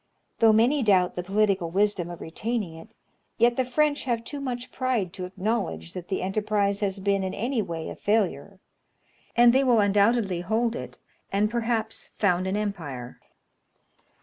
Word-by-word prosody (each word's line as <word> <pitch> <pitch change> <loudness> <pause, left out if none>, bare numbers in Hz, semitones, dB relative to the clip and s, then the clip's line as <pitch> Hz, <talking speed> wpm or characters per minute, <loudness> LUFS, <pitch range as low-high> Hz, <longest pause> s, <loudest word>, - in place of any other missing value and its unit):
Though 225 -1 +6
many 240 +7 +3
doubt 190 -6 +3
the 180 - -2
political 195 -2 +1
wisdom 190 -1 +1
of 175 - -8
retaining 210 +1 -3
it, 160 0 -12 0.5
yet 235 +1 +4
the 260 - +1
French 290 +4 +1
have 235 -3 -1
too 285 +4 -6
much 250 -2 -4
pride 245 -9 -1
to 185 - -5
acknowledge 185 - -3
that 180 -1 -7
the 190 - -2
enterprise 200 0 0
has 195 -1 -1
been 195 0 +1
in 190 - -3
any 240 +2 -1
way 165 -5 -5
a - - -6
failure; 200 -3 -1 0.8
and 240 0 +6
they 265 +1 +4
will 245 -4 +4
undoubtedly 205 -2 +2
hold 225 +5 0
it, - - -7 0.3
and 210 +2 +1
perhaps 230 -2 -2
found 185 -2 +2
an 190 +2 -1
empire. 155 - -5
205 Hz, 165 wpm, -26 LUFS, 185-235 Hz, 0.8 s, Though